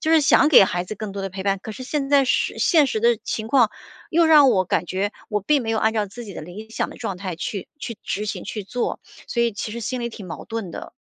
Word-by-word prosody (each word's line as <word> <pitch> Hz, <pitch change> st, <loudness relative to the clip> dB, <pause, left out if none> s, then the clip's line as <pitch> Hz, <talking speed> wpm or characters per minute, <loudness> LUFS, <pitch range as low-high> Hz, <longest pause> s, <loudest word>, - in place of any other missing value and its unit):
就 315 Hz, -, +1 dB
是 325 Hz, -1 st, +6 dB
想 295 Hz, +1 st, +5 dB
给 285 Hz, -10 st, +8 dB
孩 175 Hz, -1 st, -1 dB
子 215 Hz, -, -6 dB
更 210 Hz, -2 st, -5 dB
多 200 Hz, -, -5 dB
的 195 Hz, -, -2 dB
陪 190 Hz, +1 st, -6 dB
伴。 195 Hz, 0 st, +1 dB
可 -, -, -6 dB
是 220 Hz, -, -8 dB
现 275 Hz, 0 st, -2 dB
在 280 Hz, -2 st, +5 dB
是 -, -, 0 dB
现 315 Hz, -5 st, +4 dB
实 220 Hz, -, -1 dB
的 235 Hz, +1 st, +3 dB
情 220 Hz, 0 st, -3 dB
况 240 Hz, -3 st, +4 dB, 0.4 s
又 335 Hz, +1 st, +4 dB
让 300 Hz, -4 st, +7 dB
我 190 Hz, -5 st, +2 dB
感 180 Hz, -, 0 dB
觉 195 Hz, +4 st, -2 dB, 0.2 s
我 210 Hz, -1 st, 0 dB
并 285 Hz, +5 st, +2 dB
没 225 Hz, -, -2 dB
有 220 Hz, -, +1 dB
按 220 Hz, -, +2 dB
照 215 Hz, -2 st, 0 dB
自 235 Hz, +5 st, -9 dB
己 200 Hz, -, -9 dB
的 -, -, -6 dB
理 200 Hz, +7 st, -10 dB
想 -, -, -2 dB
的 -, -, -11 dB
状 200 Hz, -6 st, -4 dB
态 185 Hz, -2 st, -5 dB
去 190 Hz, +2 st, -5 dB
去 230 Hz, -7 st, -6 dB
执 210 Hz, +2 st, -3 dB
行 205 Hz, -, -4 dB
去 210 Hz, -3 st, -5 dB
做， 245 Hz, +5 st, -3 dB, 0.3 s
所 235 Hz, -, +1 dB
以 235 Hz, -2 st, +1 dB
其 210 Hz, -, -5 dB
实 235 Hz, -, -5 dB
心 245 Hz, +3 st, -3 dB
里 235 Hz, -, -2 dB
挺 215 Hz, -4 st, -10 dB
矛 170 Hz, -, -7 dB
盾 225 Hz, -5 st, -5 dB
的。 -, -, -8 dB
220 Hz, 305 characters per minute, -22 LUFS, 195-250 Hz, 0.4 s, 给